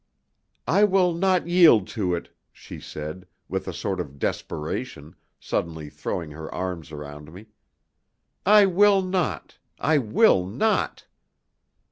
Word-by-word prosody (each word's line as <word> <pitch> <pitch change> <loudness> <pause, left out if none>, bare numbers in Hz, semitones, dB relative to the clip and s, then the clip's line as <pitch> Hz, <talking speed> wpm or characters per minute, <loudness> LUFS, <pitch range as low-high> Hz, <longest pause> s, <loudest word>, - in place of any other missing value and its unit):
"I 200 +5 +4
will 190 -3 +3
not 185 0 +1
yield 170 - +6
to 90 -5 -1
it," 85 - -8 0.2
she - - -11
said, 80 +5 -8 0.2
with 95 0 -4
a - - -2
sort 95 +2 -3
of 70 -5 -6
desperation, 75 - -4 0.2
suddenly 80 -3 -4
throwing 80 -4 -5
her 80 +1 -8
arms 90 -3 -5
around 75 0 -9
me. 100 +6 -13 0.9
"I 205 +1 +6
will 195 +1 +4
not 185 -4 -3 0.2
I 155 0 +2
will 135 - +3
not!" 210 - -1
100 Hz, 125 wpm, -24 LUFS, -, 0.9 s, yield